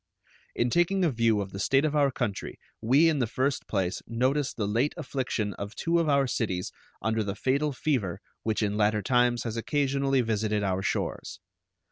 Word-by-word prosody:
In 120 0 +1
taking 175 +4 +2
a 160 - +2
view 115 -3 +2
of 100 -1 -6
the 95 - -7
state 135 +8 +3
of 155 -1 0
our 145 -2 +4
country 105 -6 -3 0.2
we 135 +8 +5
in 155 -3 +2
the 120 - +1
first 130 +4 -1
place 95 -3 -1
notice 130 +5 0
the 105 -3 -3
late 120 +8 0
affliction 125 -9 -2
of 100 +2 -6
two 170 +5 +1
of 165 -2 +1
our 140 -1 +3
cities 95 -7 -2 0.3
under 110 0 +1
the 100 -1 -3
fatal 140 +7 0
fever 125 - -1 0.2
which 110 0 -1
in 105 0 -1
latter 105 0 +2
times 120 -1 +2
has 115 -1 -4
occasionally 135 +1 +1
visited 110 -2 0
our 95 -1 0
shores. - - -3
120 Hz, 185 wpm, -27 LUFS, 105-140 Hz, 0.3 s, we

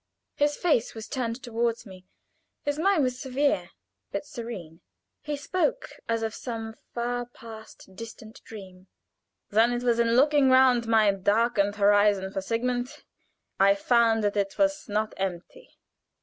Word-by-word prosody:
His 290 0 +1
face 300 -12 +1
was 220 -1 -7
turned 245 -1 -3
toward 235 -1 -2
me; 185 -2 -13 0.6
his 290 +1 -2
mien 370 -3 +3
was 255 -1 -1
severe, 280 +2 0 0.4
but - - -4
serene; 215 - -8 0.4
he 295 -1 -4
spoke 370 +12 -1 0.2
as 230 0 0
of 220 -1 -2
some 225 -3 -6 0.2
far 245 0 -3
past, 220 -5 -13
distant 225 +1 -11
dream. 190 -3 -12 0.6
"Then 225 +3 +4
it 240 0 -2
was 235 -1 +2
in 230 0 +2
looking 285 +1 +4
round 255 -2 +5
my 220 -2 +4
darkened 205 +1 +1
horizon 205 -1 +3
for 195 - -2
Sigmund, 245 +4 -2 0.6
I 200 +1 +5
found 225 +1 +2
that 205 0 0
it 195 -1 -1
was 295 -3 0
not 215 +1 -1
empty. 190 - -5
230 Hz, 145 wpm, -26 LUFS, 205-255 Hz, 0.6 s, round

